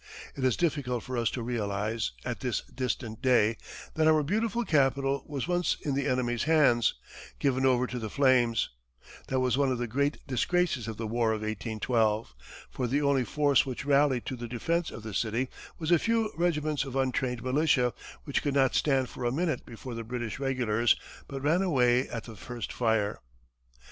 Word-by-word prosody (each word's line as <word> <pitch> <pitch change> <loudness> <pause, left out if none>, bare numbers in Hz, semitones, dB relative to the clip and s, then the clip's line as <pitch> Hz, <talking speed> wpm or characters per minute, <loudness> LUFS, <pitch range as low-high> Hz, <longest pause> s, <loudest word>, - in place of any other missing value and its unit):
It 135 - -5
is 130 -3 +2
difficult 140 -8 -1
for 130 - -5
us 120 -1 +1
to 120 - -4
realize, 110 - -2
at - - -3
this - - -1
distant 120 -3 -4
day, 120 -4 +4 0.4
that 155 0 +2
our 155 -1 +5
beautiful 225 +8 0
capital 135 -3 +2
was 145 -1 -3
once 175 0 +1
in 145 - -1
the 140 0 0
enemy's 120 -1 0
hands, 145 -8 +4 0.4
given 135 -1 +2
over 125 -1 +3
to 125 0 -5
the 110 -2 -4
flames; 125 -3 +3 0.6
that 130 - 0
was 130 +1 +1
one 140 -2 +3
of 125 - 0
the 120 - -2
great 140 +5 0
disgraces 140 -1 0
of 110 -2 -5
the 115 - -3
War 115 0 +1
of 110 - -3
1812; 110 - -1 0.4
for 125 - -2
the 140 +5 +1
only 140 -2 +3
force 145 0 +3
which 130 +1 -5
rallied 140 -3 +3
to 130 - -3
the 120 -1 -6
defense 165 +8 -1
of 115 - -9
the 110 -1 -6
city 120 +5 -1 0.3
was 160 0 -2
a 170 - +6
few 225 0 +1
regiments 155 -4 0
of 135 -2 -7
untrained 130 -2 0
militia, 130 -2 +2 0.3
which 140 - -1
could 145 -2 -1
not 135 -1 +3
stand 135 -3 +2
for 125 - -8
a 120 - +1
minute 160 +4 -1
before 120 +2 -8
the 115 0 -5
British 120 +1 -4
regulars, 120 -4 +2 0.3
but 135 -1 -6
ran 160 +5 +3
away 125 -8 +2
at 115 -2 -5
the 115 - -10
first 120 +3 -6
fire. 110 -3 +1
130 Hz, 190 wpm, -29 LUFS, 120-145 Hz, 0.6 s, a